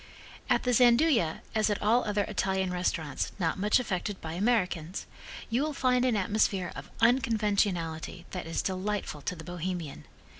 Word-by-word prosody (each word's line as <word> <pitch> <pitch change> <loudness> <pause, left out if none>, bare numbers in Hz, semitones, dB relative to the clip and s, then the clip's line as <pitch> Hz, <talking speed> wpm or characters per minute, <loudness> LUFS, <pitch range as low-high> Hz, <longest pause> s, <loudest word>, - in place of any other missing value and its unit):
At - - +3
the 250 - +1
Gianduja, 240 - +4
as 220 -1 +2
at 205 - 0
all 230 +4 +3
other 205 -1 +1
Italian 190 -2 -1
restaurants 165 -5 -1
not 175 -1 -1
much 210 +5 +3
affected 205 -3 -3
by 160 0 -6
Americans, 185 -4 0 0.5
you 240 +4 +2
will 305 +1 -1
find 250 -2 +2
an 250 -3 +2
atmosphere 195 -2 +1
of - - -8
unconventionality 200 -9 +1
that 180 -3 -5
is 165 - -1
delightful 190 -4 -2
to 180 - -3
the 160 - -10
Bohemian. 175 - -5
195 Hz, 155 wpm, -29 LUFS, 175-225 Hz, 0.5 s, Gianduja